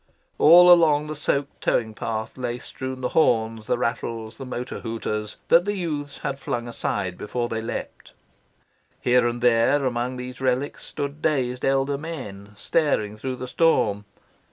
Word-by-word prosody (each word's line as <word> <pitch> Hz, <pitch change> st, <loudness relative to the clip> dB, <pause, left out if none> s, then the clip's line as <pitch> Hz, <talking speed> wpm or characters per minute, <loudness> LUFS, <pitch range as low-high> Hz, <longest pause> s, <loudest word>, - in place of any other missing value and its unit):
All 175 Hz, +3 st, +9 dB
along 155 Hz, -4 st, +4 dB
the 155 Hz, 0 st, -5 dB
soaked 140 Hz, -1 st, -2 dB
towing 110 Hz, -2 st, 0 dB
path 110 Hz, 0 st, -4 dB
lay 120 Hz, -2 st, -3 dB
strewn 130 Hz, +1 st, -7 dB
the 125 Hz, -, -1 dB
horns, 115 Hz, -7 st, +1 dB
the -, -, +1 dB
rattles, 115 Hz, -2 st, -3 dB
the 135 Hz, -, -7 dB
motor 125 Hz, 0 st, -5 dB
hooters, 110 Hz, -2 st, -4 dB
that 170 Hz, +2 st, +6 dB
the 205 Hz, 0 st, -1 dB
youths 150 Hz, -6 st, -4 dB
had 135 Hz, 0 st, -3 dB
flung 120 Hz, -3 st, -3 dB
aside 100 Hz, -5 st, -3 dB
before 120 Hz, +3 st, -2 dB
they 115 Hz, -1 st, -3 dB
leapt. 115 Hz, -, -6 dB, 0.9 s
Here 125 Hz, -1 st, +3 dB
and 120 Hz, 0 st, -3 dB
there 125 Hz, +4 st, +4 dB
among 125 Hz, 0 st, -1 dB
these 125 Hz, +1 st, -7 dB
relics 130 Hz, +2 st, -1 dB
stood 145 Hz, +1 st, -5 dB
dazed 125 Hz, -5 st, 0 dB
elder 135 Hz, +1 st, +1 dB
men, 105 Hz, -11 st, -7 dB
staring 110 Hz, -10 st, 0 dB
through 130 Hz, +4 st, -4 dB
the 125 Hz, 0 st, -6 dB
storm. 110 Hz, -10 st, +2 dB
125 Hz, 155 wpm, -24 LUFS, 115-145 Hz, 0.9 s, All